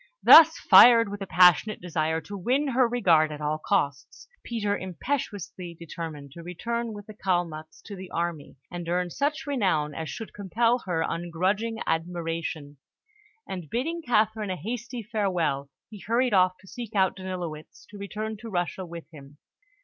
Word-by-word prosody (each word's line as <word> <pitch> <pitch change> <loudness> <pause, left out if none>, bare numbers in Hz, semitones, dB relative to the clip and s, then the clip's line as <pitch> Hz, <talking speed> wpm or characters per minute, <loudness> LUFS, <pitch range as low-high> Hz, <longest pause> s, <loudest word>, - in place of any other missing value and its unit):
Thus 325 0 +9
fired 230 -3 +7
with 205 0 -7
a 195 - -4
passionate 180 +4 +4
desire 160 -2 -1
to 200 - -9
win 260 +9 0
her 255 -1 +3
regard 170 -10 +3
at 150 - -7
all 150 +1 -2
costs, 140 -2 -2 0.2
Peter 210 -4 -1
impetuously 185 - -5
determined 160 -4 -8
to 170 - -10
return 230 +7 -4
with 205 -1 -9
the 215 - -11
Kalmuks 175 -6 -3
to 205 - -8
the 185 -1 -9
army, 170 -5 -4
and 175 -1 -6
earn 180 0 -1
such 285 - -2
renown 185 - 0
as 160 +1 -5
should 225 - -7
compel 230 +5 +1
her 165 -2 0
ungrudging 190 +7 -2
admiration; 165 -3 -3 0.7
and 180 -5 -6
bidding 325 +8 -2
Catherine 220 -5 +1
a 185 - -1
hasty 235 - -5
farewell, 180 - -1 0.2
he 210 - -10
hurried 235 +3 0
off 185 -1 +3
to 190 - -18
seek 230 0 -8
out 190 -2 +2
Danilowitz 180 -5 -7
to 205 - -10
return 215 +2 -5
to 225 +2 -9
Russia 180 -1 -2
with 170 -1 -9
him. 145 -2 -14
185 Hz, 160 wpm, -26 LUFS, 165-225 Hz, 0.7 s, Thus